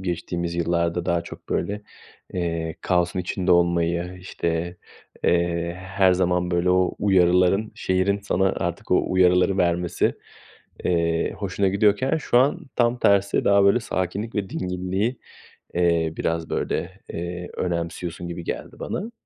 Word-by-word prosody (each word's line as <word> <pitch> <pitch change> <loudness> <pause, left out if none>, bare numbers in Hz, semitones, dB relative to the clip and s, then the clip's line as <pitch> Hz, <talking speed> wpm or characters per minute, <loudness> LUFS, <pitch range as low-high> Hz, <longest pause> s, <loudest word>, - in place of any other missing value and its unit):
geçtiğimiz 85 -1 -3
yıllarda 85 0 0
daha 85 0 +1
çok, 85 - -11
böyle, 105 +1 -2 0.5
eee, 85 -2 -2
kaosun 90 0 +1
içinde 90 0 0
olmayı, 85 0 +1
işte, 85 -1 -3 0.5
eee, 85 0 +1
her 95 0 +2
zaman, 90 -1 +1
böyle, 85 +1 +2
o 90 0 +2
uyarıların, 95 +1 +3
şehrin 95 +2 +1
sana 95 -1 +1
artık - - -4
o - - +4
uyarıları 90 +1 +4
vermesi, 85 -1 +1 0.7
eee, 85 -1 +1
hoşuna 100 -1 0
gidiyorken 105 +8 +2
şu 135 -5 +2
an 135 +3 +2
tam 120 0 +2
tersi 100 -3 +3
daha, 100 0 +5
böyle, 100 +5 +4
sakinlik 100 +1 -3
ve 100 -3 -2
dinginliği, 95 +6 -2 0.6
eee, 85 -2 +2
biraz, 80 0 -1
böyle, 95 +3 -2
eee, 85 +1 -5
önemsiyorsun 85 0 -3
gibi 85 0 -6
geldi - - -6
bana. 215 +6 -4
90 Hz, 130 wpm, -24 LUFS, 85-95 Hz, 0.7 s, daha